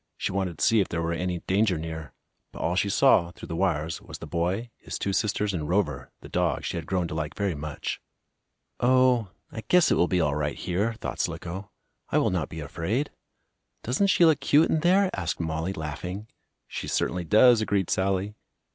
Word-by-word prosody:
She - - -2
wanted 95 -4 -2
to 75 - +1
see 115 - +4
if 100 - +1
there 85 -1 -2
were 85 0 -1
any 90 0 -2
danger 95 -2 +2
near. 80 -2 -6 0.4
But - - -8
all 85 +2 0
she 100 +2 +1
saw, 100 -6 +4
through 85 - -11
the 85 - -3
wires, 80 -3 -1
was - - -9
the - - -8
boy, 90 +8 -2
his - - -6
two 100 - -2
sisters 105 0 0
and 75 -4 -3
Rover, 100 +2 0
the - - -10
dog - - 0
she - - -3
had - - -5
grown 90 -2 0
to - - -5
like 75 -1 -3
very 100 -3 0
much. 75 -1 -5 0.8
"Oh, 125 -3 +3 0.2
I 110 - -6
guess 180 -2 +5
it - - +3
will 90 - +3
be 90 - +1
all 75 -4 +2
right 75 -1 -2
here," 100 +6 -1
thought - - -6
Slicko. 85 +4 -3 0.4
"I - - +1
will - - +2
not 85 -6 -1
be 80 - -7
afraid." 85 - -2 0.7
"Doesn't 130 - +1
she 180 -3 +5
look 160 -3 +4
cute 145 +2 +4
in 160 - +2
there?" 185 +4 +3
asked 85 -5 -2
Mollie, 80 +2 -2
laughing. 90 +5 -5 0.4
"She - - -5
certainly 90 0 0
does," 110 +6 +6
agreed 100 -4 0
Sallie. 95 +2 0
95 Hz, 205 wpm, -26 LUFS, 80-110 Hz, 0.8 s, does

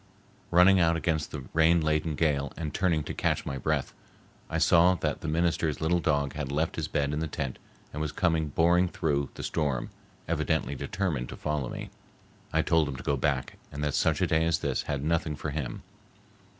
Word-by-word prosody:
Running 90 +2 +6
out 85 -1 +3
against 80 -2 -1
the 70 -4 -6
rain 80 +1 +5
laden 75 0 0
gale 70 -3 +1
and 80 -3 -4
turning 85 -5 +1
to - - -5
catch - - 0
my 70 -1 -4
breath, - - -1 0.6
I 80 - -1
saw 85 +2 +5
that 75 -4 -2
the - - -5
minister's 80 -1 0
little 85 +2 +2
dog 70 -4 0
had 70 -2 -4
left 80 +3 0
his 80 -2 -2
bed 70 -1 -1
in 75 - -1
the 80 - -1
tent 70 -4 -4 0.3
and 75 - -4
was 75 -1 -2
coming 80 -3 +1
boring 85 +5 +3
through 70 -5 -1
the - - -7
storm, 70 -6 -1 0.4
evidently - - 0
determined 70 -2 -2
to - - -7
follow 75 -4 -2
me. - - -7 0.6
I - - +2
told 80 -3 +2
him 70 - -4
to - - -8
go 70 - +1
back, 65 - -1
that 75 0 -2
such - - +1
a - - +4
day 80 0 +2
as 80 -1 +2
this 70 -5 -1
had 70 -2 -1
nothing 80 -1 0
for 75 - -4
him. 70 -5 -4
80 Hz, 200 wpm, -28 LUFS, 70-80 Hz, 0.6 s, Running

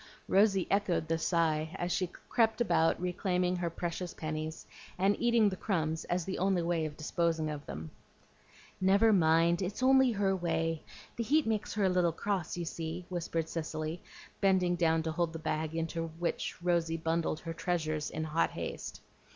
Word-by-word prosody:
Rosy 195 -1 +4
echoed 195 -5 +1
the 165 0 0
sigh 160 -2 +1
as 175 0 -2
she 185 - +1
crept 220 +5 0
about 165 -8 +3
reclaiming 180 0 0
her 175 -1 -1
precious 170 +1 -4
pennies, 155 0 -4 0.3
and 195 +2 +3
eating 235 -2 +4
the 195 - 0
crumbs 160 -5 -1
as 175 -1 -1
the 190 - -3
only 185 -1 +2
way 165 -2 0
of 150 - -10
disposing 160 0 0
of 145 -1 -6
them. 80 +1 -6 0.9
"Never 200 +4 +5
mind, 170 -1 +4
it's 195 +7 -3
only 265 -1 +6
her 195 -2 +1
way; 165 -2 -1 0.4
the 235 - 0
heat 300 +7 +3
makes 220 -2 -1
her 210 - +1
a 190 - +4
little 180 -2 +2
cross, 185 0 -2
you 175 - -3
see," 165 +2 -5
whispered 165 -2 -2
Cicely, 160 0 -4 0.4
bending 185 -3 +3
down 165 -2 +2
to 160 - -2
hold 170 0 -1
the - - -4
bag, 155 0 -2
into 165 0 -2
which 175 0 -2
Rosy 170 -2 +1
bundled 165 -1 -1
her 165 -1 -5
treasures 165 -3 -1
in 160 - -4
hot 155 +1 +1
haste. - - -6
170 Hz, 175 wpm, -31 LUFS, 160-190 Hz, 0.9 s, only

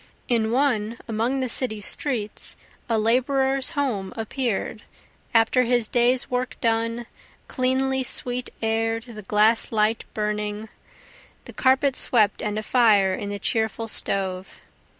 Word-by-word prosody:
In 225 -3 +1
one, 235 -3 +1
among 235 +4 -1
the 260 - 0
city 235 -2 -1
streets 215 +1 -1 0.3
a 225 - +2
laborer's 265 +4 +1
home 215 -10 -1
appear'd, 225 -1 -2 0.5
After 225 +2 +4
his 240 -2 +1
day's 245 +2 +2
work 250 0 -3
done, 230 0 0 0.4
cleanly, 265 +1 0
sweet 250 -1 -2
air'd, 225 0 0
the 230 -3 -10
gaslight 215 +1 +2
burning, 210 0 -3 0.8
The - - -10
carpet 265 +1 +3
swept 215 -4 +2
and 210 0 -2
a 215 - -3
fire 210 -6 +4
in 200 +2 -4
the 205 - -3
cheerful 220 +1 -1
stove. 190 -3 -3
230 Hz, 125 wpm, -24 LUFS, 215-255 Hz, 0.8 s, After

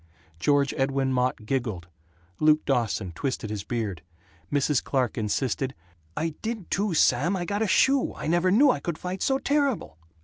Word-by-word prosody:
George 140 +7 +2
Edwin 135 0 +1
Mott 125 -3 0
giggled; 110 -9 -2 0.5
Luke 155 0 +4
Dawson 115 -8 0
twisted 110 - -3
his 105 -2 -4
beard; 105 -9 -3 0.5
Mrs. 145 -1 +1
Clark 130 -4 0
insisted, 130 +4 -1 0.4
"I 165 +2 0
did 220 -5 -5
too, 200 0 0
Sam 150 +6 +3
I 175 -2 -2
got 205 +3 -2
a 220 - +2
shoe 265 +7 +3
I - - -7
never 175 +3 +2
knew 260 +9 +6
I - - -2
could 170 -3 -4
fight 180 +1 -5
so 270 - +2
terrible!" 280 - 0
140 Hz, 165 wpm, -26 LUFS, 120-185 Hz, 0.5 s, knew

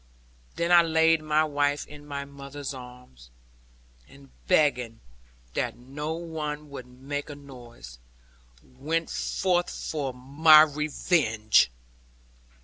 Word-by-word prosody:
Then 170 +1 -1
I 175 -1 +8
laid 160 -1 +3
my 155 0 +2
wife 145 -1 0
in 150 0 -13
my 140 -1 -5
mother's 140 0 -8
arms, 125 - -13 0.8
and 70 -1 -18 0.2
begging 125 - +2 0.5
that 120 -2 -2
no 145 +5 -5
one 150 -3 -5
would 130 -3 -8
make 135 +4 -6
a 145 - -7
noise, 120 - -13 0.6
went 155 +6 -3
forth 180 -2 0
for 145 -4 -4
my 145 +5 +6
revenge. 145 - +2
145 Hz, 110 wpm, -26 LUFS, 125-155 Hz, 0.8 s, I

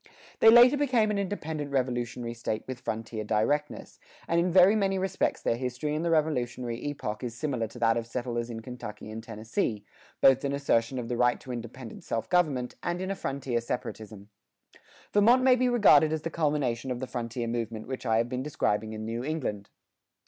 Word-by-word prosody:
They 225 - +8
later 240 +4 +8
became 245 -7 +2
an 205 - 0
independent 160 -7 -3
Revolutionary 120 -3 -2
state 115 -2 -3
with 130 -1 -6
frontier 110 -1 -4
directness, 130 +8 -1 0.3
and 170 - +2
in 175 +2 +2
very 185 +3 +6
many 195 -2 +1
respects 190 0 -1
their 115 - +1
history 125 +4 -3
in 155 - -1
the 170 - 0
Revolutionary 125 -7 -1
epoch 130 -6 -4
is 120 -2 -4
similar 125 -4 -2
to 115 - -13
that 115 -1 +2
of 115 -1 -3
settlers 120 0 -3
in 115 -1 -6
Kentucky 110 -3 -8
and 110 +1 -6
Tennessee, 110 -1 -3 0.3
both 135 0 +5
in 140 0 -1
assertion 130 -3 +1
of 120 -2 -4
the 120 - -2
right 125 0 +3
to 130 - -8
independent 120 0 -8
self 115 -1 -3
government 145 -9 +1
and 175 0 -2
in 190 +1 -3
a - - -2
frontier 135 -7 -2
separatism.[78:1] 105 -3 -8 0.3
Vermont 235 +5 +5
may 255 -1 +6
be 250 0 +2
regarded 210 -9 +5
as 160 -1 -2
the 165 - -3
culmination 140 -6 -1
of 125 -1 -3
the 130 - -3
frontier 120 -1 -4
movement 115 -2 -3
which 130 0 -5
I 110 0 +3
have 115 +1 +1
been 125 +1 -3
describing 110 -6 -1
in 110 0 -6
New 115 +2 -3
England. 130 -10 -3
125 Hz, 190 wpm, -28 LUFS, 115-160 Hz, 0.3 s, They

